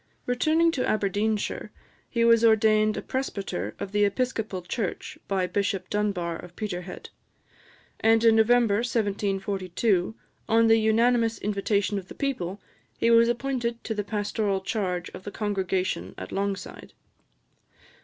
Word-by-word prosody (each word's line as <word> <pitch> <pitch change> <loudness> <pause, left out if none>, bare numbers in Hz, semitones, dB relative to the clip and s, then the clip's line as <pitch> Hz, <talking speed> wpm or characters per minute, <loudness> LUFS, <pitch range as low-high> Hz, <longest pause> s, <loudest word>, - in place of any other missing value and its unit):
Returning 315 +7 +2
to 260 -6 -1
Aberdeenshire, 210 +1 -1 0.4
he 235 -1 +1
was 230 0 +5
ordained 215 -1 +4
a - - -4
presbyter 260 -7 -3
of 195 - -6
the 205 0 +2
Episcopal 210 -3 -1
Church, 230 - -4
by 190 -2 0
Bishop 195 0 -2
Dunbar 195 -5 -1
of 175 +1 -12
Peterhead; 180 -4 -6 0.9
and 225 +1 +4
in 225 -1 +6
November 225 -1 +4
1742, 200 -3 0 0.3
on 230 +1 +5
the 225 0 +6
unanimous 225 +1 +2
invitation 205 0 0
of 190 - -12
the - - -11
people, 205 -9 -3 0.4
he 230 - +2
was 230 0 +6
appointed 240 -1 -2
to 220 - -3
the 210 -1 -2
pastoral 205 -1 -1
charge 190 -3 -2
of 185 - -10
the 205 - -5
congregation 190 - -2
at 95 - -7
Longside. 195 0 -4
210 Hz, 135 wpm, -26 LUFS, 195-230 Hz, 0.9 s, in